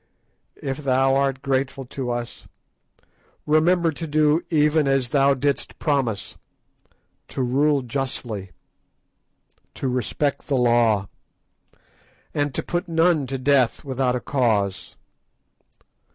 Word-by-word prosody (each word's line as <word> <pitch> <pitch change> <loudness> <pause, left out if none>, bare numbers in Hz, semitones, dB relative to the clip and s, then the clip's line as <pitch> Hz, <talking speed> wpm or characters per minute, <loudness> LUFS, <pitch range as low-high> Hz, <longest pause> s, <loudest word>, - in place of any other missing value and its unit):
If 135 -1 -4
thou 135 -1 +2
art 135 -1 0
grateful 135 0 -1
to 125 0 -5
us, 120 0 -5 1.0
remember 165 +2 +3
to 165 +2 -6
do 155 +1 +3
even 150 -1 +3
as 135 -3 +1
thou 140 0 +3
didst 140 +2 -2
promise: 135 -9 -1 0.9
to 130 - -3
rule 140 +3 +2
justly, 120 -6 -4 1.3
to 135 - -3
respect 130 +3 -1
the 140 - +1
law, 115 -5 +3 1.3
and 145 -1 0
to - - -1
put 175 +1 -2
none 165 -3 +2
to 135 +1 -3
death 130 0 +2
without 130 -2 0
a - - -1
cause. 110 -8 -1
135 Hz, 110 wpm, -23 LUFS, 125-145 Hz, 1.3 s, remember